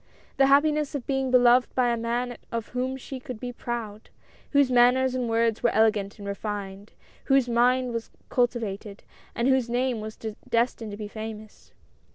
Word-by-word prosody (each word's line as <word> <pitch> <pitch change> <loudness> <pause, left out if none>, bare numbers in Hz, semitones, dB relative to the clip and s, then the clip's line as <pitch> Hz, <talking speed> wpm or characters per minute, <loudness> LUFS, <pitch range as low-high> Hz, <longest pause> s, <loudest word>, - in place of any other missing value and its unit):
The 270 - +5
happiness 295 +1 +3
of 275 - -4
being 270 -1 -1
beloved 250 0 +4
by 250 -2 +3
a 235 - +1
man 240 +1 -2 0.2
of 230 -2 -4
whom 255 +1 -2
she 265 0 -8
could 250 -3 -8
be 245 0 -5
proud; 225 -3 -6 0.4
whose 280 -3 +3
manners 250 +1 +4
and 250 -2 -2
words 225 -1 +1
were - - +3
elegant 215 -2 +1
and 200 -1 -8
refined; 200 0 -5 0.3
whose 270 -2 +3
mind 245 +1 +2
was 230 0 -4 0.2
culti 245 -1 +1
vated, 200 0 -6 0.3
and 235 - 0
whose 260 -3 +2
name 245 -1 0
was 215 0 -7 0.3
destined 230 -1 0
to 205 - -7
be 210 -1 -5
famous. 215 0 -9
240 Hz, 175 wpm, -26 LUFS, 220-255 Hz, 0.4 s, The